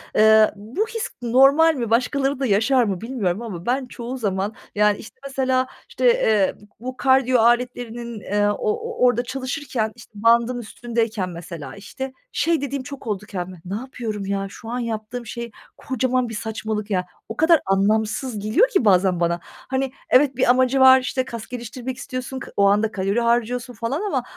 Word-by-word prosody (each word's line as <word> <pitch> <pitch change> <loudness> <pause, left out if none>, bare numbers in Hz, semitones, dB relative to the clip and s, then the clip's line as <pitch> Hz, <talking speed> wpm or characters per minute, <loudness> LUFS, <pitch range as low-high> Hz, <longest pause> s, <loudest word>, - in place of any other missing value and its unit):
eee, 220 0 +6
bu 235 - -3
his 460 -1 -4
normal 275 +7 +5
mi, 235 -4 -3
başkaları 270 +3 +1
da 270 - 0
yaşar 240 +5 +3
mı 195 -4 -2
bilmiyorum 225 -5 -2
ama 190 -7 -7
ben 255 +2 0
çoğu 245 +1 -6
zaman 200 -1 -1 0.2
yani, 210 0 +3
işte, 225 - -13
mesela, 260 -1 +1 0.2
işte, - - -2
eee, 220 - +3 0.2
bu 245 - -13
bu 255 - -20
kardiyo 260 -2 +3
aletlerinin, 240 -1 0
eee, 205 +1 0
o 205 - 0
o 455 - -1
orada 245 0 +3
çalışırken, 255 -3 -3
işte, 230 - -15
bandın 235 +3 +3
üstündeyken 225 -3 -2
mesela, 170 -3 -8
işte, 260 +7 -7 0.2
şey 330 -3 +1
dediğim 280 -1 -3
çok 275 -2 -9
oldu 210 -1 -3
kendime, 185 -4 -6
"Ne 190 - -4
yapıyorum 225 -4 -5
ya? 195 0 -2
Şu 225 +3 -10
an 245 +1 -2
yaptığım 230 +1 -4
şey 235 0 -6 0.3
kocaman 255 -2 -1
bir - - -7
saçmalık 220 -1 -4
ya." 180 -1 +1 0.2
O 225 - -6
kadar 320 0 +5
anlamsız 215 +4 +1
geliyor 255 - +3
ki 380 - +1
bazen 185 -2 +4
bana. 170 0 +1
Hani, 265 0 -4 0.2
evet, 265 0 +4
bir 255 - +2
amacı 255 +1 +4
var, 260 0 +8
işte, 260 0 -2
kas 230 -3 -7
geliştirmek 245 +1 -6
istiyorsun, 260 0 -5
ka - - -9
o 200 - +5
anda 210 +2 +3
kalori 195 +3 0
harcıyorsun 240 +1 0
falan 235 - -3
ama 285 -12 -1
235 Hz, 175 wpm, -22 LUFS, 210-260 Hz, 0.3 s, var